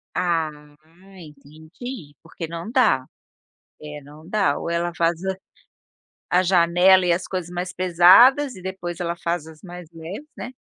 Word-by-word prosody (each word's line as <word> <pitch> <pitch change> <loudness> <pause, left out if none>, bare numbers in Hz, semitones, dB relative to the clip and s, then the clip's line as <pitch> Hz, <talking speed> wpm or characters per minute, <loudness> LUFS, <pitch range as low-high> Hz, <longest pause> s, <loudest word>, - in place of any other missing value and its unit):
Ah, 170 -3 0 0.7
entendi. 155 - -11
Porque 165 0 -8
não 170 +6 -7
dá. 215 - +2 0.8
É, 150 -1 -9
não 150 +3 -15
dá 195 -7 0
ou - - -5
ela 170 0 -2
faz 170 +1 0
a 190 0 -1 0.9
a 180 +1 +3
janela 180 +1 +4
e 175 - +3
as 175 +2 -3
coisas 185 -2 -5
mais 180 +1 -5
pesadas 185 +11 +5
e - - -11
depois 180 -2 -6
ela 170 -1 -3
faz 170 -2 -2
as 155 -1 -15
mais 175 -3 -10
leves, 170 - -9
né.. 245 - -8
175 Hz, 150 wpm, -22 LUFS, 165-185 Hz, 0.9 s, pesadas